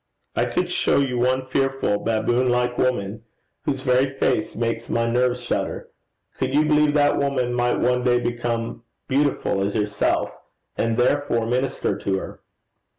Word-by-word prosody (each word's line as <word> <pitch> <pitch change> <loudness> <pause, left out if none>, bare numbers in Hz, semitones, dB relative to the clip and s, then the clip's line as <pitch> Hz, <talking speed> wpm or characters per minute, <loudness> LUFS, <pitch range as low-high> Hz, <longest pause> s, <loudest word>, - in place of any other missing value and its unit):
I - - +2
could - - -1
show - - +2
you 130 -3 +1
one 130 +2 +2
fearful 135 -5 0
baboon 115 +3 +1
like 125 0 +1
woman, 110 -5 -1 0.4
whose 135 -2 -1
very 130 +1 +3
face 135 -4 -1
makes 115 0 -2
my 115 0 +1
nerves 125 +1 +1
shudder: - - -3 0.5
could 130 - -1
you 150 +1 +4
believe 150 -1 +3
that 145 -1 +3
woman 135 -3 0
might 120 0 +1
one 125 0 +1
day 120 -1 +3
become 120 -1 -1
a - - -3
lady, 115 - -8 0.4
beautiful 100 -8 -1
as 100 +1 -2
yourself, 105 -1 0 0.4
and 115 0 0
therefore 125 -2 +1
minister 125 -3 -1
to 95 -1 -1
her? - - -7
125 Hz, 160 wpm, -23 LUFS, 115-130 Hz, 0.5 s, you